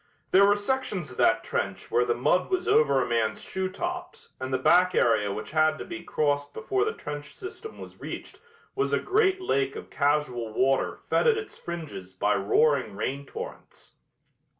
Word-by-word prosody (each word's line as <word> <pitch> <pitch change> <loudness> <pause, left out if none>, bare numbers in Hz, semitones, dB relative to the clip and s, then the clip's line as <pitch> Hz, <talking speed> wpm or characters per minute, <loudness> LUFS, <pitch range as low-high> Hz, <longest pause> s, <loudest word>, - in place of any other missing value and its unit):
There 200 +1 +7
were 205 - +5
sections 205 - -2
of 125 - -12
that 115 - +3
trench 100 -1 -3
where 120 +1 +3
the 120 -1 +1
mud 155 +9 +2
was 370 -1 -1
over 140 -3 +4
a - - -4
man's 115 -2 0
shoetops 350 - -4
and 130 0 -4
the 130 - +2
back 180 +7 +4
area 105 -3 +3
which 105 +2 -6
had 155 0 +3
to - - -6
be 170 -2 -7
crossed 145 -3 -1
before 390 - 0
the 445 - -1
trench 145 - -7
system 410 +4 -9
was - - -11
reached - - -7 0.3
was 410 - 0
a - - +3
great 385 -1 +2
lake 140 - 0
of - - -9
casual 140 -6 0
water 135 +3 +1
fed - - +2
at 455 -2 +5
its 430 -1 -6
fringes 145 - -7
by 105 +2 +2
roaring 110 +3 +2
rain 140 +6 -3
torrents. - - -9
150 Hz, 180 wpm, -27 LUFS, 125-205 Hz, 0.3 s, There